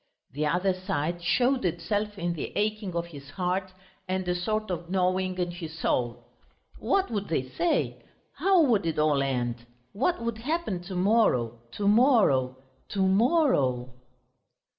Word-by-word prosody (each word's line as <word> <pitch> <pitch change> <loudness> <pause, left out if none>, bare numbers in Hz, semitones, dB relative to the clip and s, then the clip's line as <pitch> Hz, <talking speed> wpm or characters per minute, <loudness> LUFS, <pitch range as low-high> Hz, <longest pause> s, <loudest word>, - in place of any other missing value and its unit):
The 150 +3 -1
other 180 +4 +1
side 175 -3 -2
showed 250 +9 +2
itself 200 +5 -1
in 175 -2 -1
the 160 - -5
aching 210 -3 -1
of 170 0 -1
his 145 -5 -11
heart, 185 +3 -2 0.4
and 185 0 -2
a 180 - +2
sort 215 +3 -2
of 170 -1 -4
gnawing 185 0 0
in 175 -1 -1
his 165 -2 -8
soul. 120 -7 -1 0.5
"What 390 -6 +1
would 205 -2 -2
they 130 -5 -1
say? 340 - 0 0.3
How 380 -3 +4
would 220 - +2
it 160 - -1
all 150 -2 +3
end? 120 -3 -2 0.3
What 275 - 0
would 230 -1 -3
happen 275 - -2
to 190 0 -6
morrow, 180 - +2
to 205 - -2
morrow, 205 - +4 0.3
to 195 -2 +1
morrow?"... 190 - +2
185 Hz, 150 wpm, -27 LUFS, 160-215 Hz, 0.5 s, How